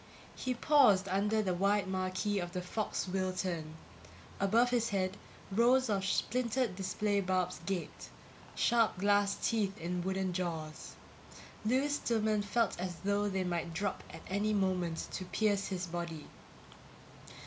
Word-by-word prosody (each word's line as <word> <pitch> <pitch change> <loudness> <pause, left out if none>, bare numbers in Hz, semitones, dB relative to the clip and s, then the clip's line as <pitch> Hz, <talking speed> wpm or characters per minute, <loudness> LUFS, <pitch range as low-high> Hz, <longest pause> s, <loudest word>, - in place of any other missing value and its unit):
He 255 -1 -2
paused 240 -9 +5
under 210 +3 +1
the 185 -2 0
wide 200 +2 +2
marquee 190 +2 -1
of 175 -1 -5
the 180 - -2
FOX 205 +2 -2
WILTERN. 185 -4 -2 0.6
Above 230 +5 +3
his 235 -2 +1
head, 190 -1 0 0.4
rows 240 +3 +4
of 195 -2 0
splintered 235 +1 0
display 200 +2 0
bulbs 185 -1 0
gaped 190 -3 -4 0.5
sharp 230 -4 +3
glass 205 +1 +3
teeth 205 -4 0
in 175 +2 -3
wooden 190 0 -1
jaws. 160 -4 -4 0.7
Lewis 270 +6 +2
Stillman 220 -2 +1
felt 205 0 0
as 180 -1 -3
though 205 +1 +1
they 190 -1 -1
might 170 -2 -2
drop 200 +2 -2
at - - -10
any 205 +3 0
moment 180 -4 0
to 185 - -4
pierce 200 0 +1
his 185 -2 -3
body. 170 -3 -5
195 Hz, 135 wpm, -33 LUFS, 185-215 Hz, 0.7 s, paused